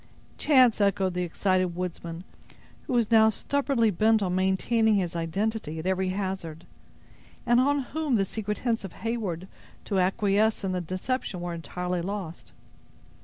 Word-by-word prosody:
"Chance!" 255 Hz, -7 st, +5 dB
echoed 195 Hz, -2 st, +2 dB
the 180 Hz, -, -2 dB
excited 185 Hz, 0 st, 0 dB
woodsman, 170 Hz, -1 st, -5 dB, 0.6 s
who -, -, -2 dB
was 235 Hz, -2 st, +1 dB
now 220 Hz, -1 st, +7 dB
stubbornly 265 Hz, 0 st, +1 dB
bent 215 Hz, +3 st, +3 dB
on 180 Hz, -2 st, -1 dB
maintaining 200 Hz, +4 st, +2 dB
his 180 Hz, -3 st, -1 dB
identity 170 Hz, +1 st, -2 dB
at 160 Hz, -, -6 dB
every 190 Hz, 0 st, 0 dB
hazard, 185 Hz, -4 st, -4 dB, 0.8 s
and 240 Hz, 0 st, +4 dB
on 285 Hz, +2 st, +2 dB
whom 300 Hz, 0 st, -1 dB
the 195 Hz, -3 st, +2 dB
secret 210 Hz, +1 st, -4 dB
hints 230 Hz, -3 st, +1 dB
of 195 Hz, -, -7 dB
Heyward 205 Hz, -7 st, -3 dB, 0.4 s
to 195 Hz, -3 st, 0 dB
acquiesce 205 Hz, +3 st, +2 dB
in 190 Hz, -, -1 dB
the 180 Hz, -1 st, -1 dB
deception 185 Hz, +4 st, -3 dB
were 175 Hz, 0 st, -4 dB
entirely 180 Hz, +1 st, -3 dB
lost. 185 Hz, -2 st, -6 dB
195 Hz, 150 wpm, -27 LUFS, 180-225 Hz, 0.8 s, now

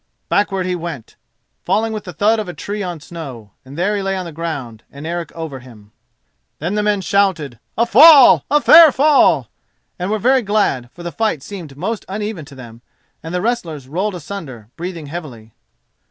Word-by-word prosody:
Backward 195 Hz, -2 st, 0 dB
he 180 Hz, 0 st, -1 dB
went, 165 Hz, -8 st, -7 dB, 0.5 s
falling 220 Hz, +1 st, 0 dB
with 215 Hz, -2 st, -6 dB
the 180 Hz, -, -7 dB
thud 210 Hz, +7 st, +2 dB
of 210 Hz, -4 st, -4 dB
a 175 Hz, -, -7 dB
tree 205 Hz, +6 st, -5 dB
on 175 Hz, -4 st, -5 dB
snow, 135 Hz, -, -9 dB
and 135 Hz, +3 st, -12 dB
there 195 Hz, +4 st, 0 dB
he 200 Hz, -, -2 dB
lay 195 Hz, 0 st, -2 dB
on 185 Hz, -, -4 dB
the 170 Hz, -, -7 dB
ground, 145 Hz, -9 st, -6 dB
and 140 Hz, +2 st, -10 dB
Eric 170 Hz, -1 st, -4 dB
over 160 Hz, -5 st, -6 dB
him. 110 Hz, -5 st, -16 dB, 0.7 s
Then 175 Hz, +6 st, -3 dB
men 210 Hz, -1 st, 0 dB
shouted 180 Hz, -, 0 dB, 0.2 s
"A 235 Hz, -, +3 dB
fall! 280 Hz, +4 st, +8 dB
a 295 Hz, -, +4 dB
fair 320 Hz, +1 st, +8 dB
fall!" 265 Hz, -, +3 dB, 0.5 s
and 180 Hz, +2 st, -2 dB
were 215 Hz, -, 0 dB
very 255 Hz, +4 st, +3 dB
glad, 200 Hz, -, 0 dB
for 175 Hz, -, -12 dB
the 175 Hz, -, -5 dB
fight 215 Hz, -11 st, -1 dB
seemed 170 Hz, -9 st, -9 dB
most 210 Hz, +7 st, -3 dB
uneven 205 Hz, -4 st, -4 dB
to 140 Hz, -1 st, -14 dB
them, 120 Hz, -3 st, -12 dB, 0.4 s
and 165 Hz, -, -8 dB
the 180 Hz, 0 st, -2 dB
wrestlers 165 Hz, -, -3 dB
rolled 185 Hz, +7 st, -2 dB
asunder, 145 Hz, -, -8 dB
breathing 170 Hz, -2 st, -6 dB
heavily. 135 Hz, -9 st, -9 dB
175 Hz, 185 wpm, -18 LUFS, 145-210 Hz, 0.7 s, fall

